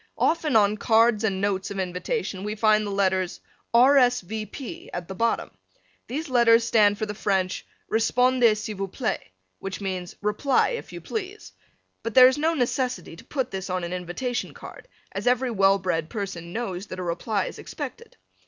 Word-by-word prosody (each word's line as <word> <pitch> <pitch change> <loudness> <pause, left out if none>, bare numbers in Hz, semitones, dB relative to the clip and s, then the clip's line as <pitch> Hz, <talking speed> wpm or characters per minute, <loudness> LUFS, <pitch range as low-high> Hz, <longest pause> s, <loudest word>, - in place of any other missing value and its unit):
Often 315 -5 +1
on 210 -1 +4
cards 225 0 +3
and 195 -3 0
notes 195 -1 -1
of 200 - -6
invitation 190 - -3
we 210 +1 -3
find 215 -1 +3
the - - -3
letters 190 -2 0 0.3
R. 255 +4 +6
S. 245 -2 +4
V. 215 +3 -5
P. 310 - -8
at 175 -1 -5
the 190 - -6
bottom. 230 +4 0 0.6
These 300 +7 -4
letters 235 -3 +5
stand 210 -3 +4
for 215 - -2
the 210 - -5
French 190 -3 -1 0.2
repondez 240 0 +3
s'il 215 -2 -5
vous 195 0 -2
plait, 220 +4 -2 0.4
which 195 -1 -5
means 185 -3 -4
"Reply, 210 +7 +2
if 475 - -5
you - - -8
please," 425 0 -6 0.5
but 230 -2 -5
there 255 -1 +10
is 260 +3 +1
no 325 +2 +2
necessity 250 - -1
to - - -13
put 265 -3 -3
this 190 0 -5
on 180 -1 -1
an 170 +1 -4
invitation 180 +8 -3
card - - -11 0.2
as - - -4
every 250 0 +2
well 195 -2 +4
bred 170 -4 -2
person 190 -6 -5
knows 200 -3 -4
that 185 - -7
a 185 - -4
reply 185 +4 -1
is - - -7
expected. 470 - -8
215 Hz, 185 wpm, -25 LUFS, 190-250 Hz, 0.6 s, there